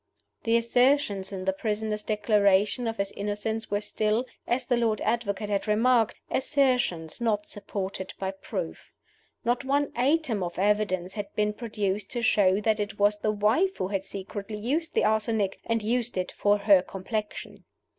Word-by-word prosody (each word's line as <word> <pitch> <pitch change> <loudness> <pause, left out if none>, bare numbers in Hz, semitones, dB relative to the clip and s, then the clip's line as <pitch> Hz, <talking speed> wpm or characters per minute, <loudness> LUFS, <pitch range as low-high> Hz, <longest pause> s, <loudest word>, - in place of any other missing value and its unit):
The 230 0 +4
assertions 235 -4 +2
in 185 -1 -5
the 190 - +2
prisoner's 210 +1 -2
Declaration 210 +1 +2
of 225 0 -3
his 200 0 -1
innocence 210 +2 -3
were 205 0 0
still, 215 +3 0 0.2
as 250 +1 0
the 245 - +2
Lord 230 -3 +1
Advocate 210 -3 -1
had 200 +2 0
remarked, 225 +2 +3 0.2
assertions 250 - +1
not 210 -3 +1
supported 195 -2 -5
by 190 0 -2
proof. 195 - -6 0.6
Not 240 +2 +1
one 280 +2 +1
atom 260 -4 +1
of 175 -1 -4
evidence 195 -2 +1
had 205 -1 -5
been 210 0 +1
produced 210 -3 -3
to 240 -1 -2
show 195 -3 +4
that 220 0 +1
it 205 -1 -3
was 205 +1 +3
the 215 - +1
wife 220 - +2
who 185 - -2
had 195 -2 -1
secretly 200 +2 -6
used 285 +10 -1
the - - +3
arsenic, 215 -2 +1
and 230 -1 0
used 240 0 -1
it 180 0 -1
for 205 0 +2
her 200 -2 +5
complexion. 210 +3 -5
210 Hz, 165 wpm, -27 LUFS, 200-235 Hz, 0.6 s, her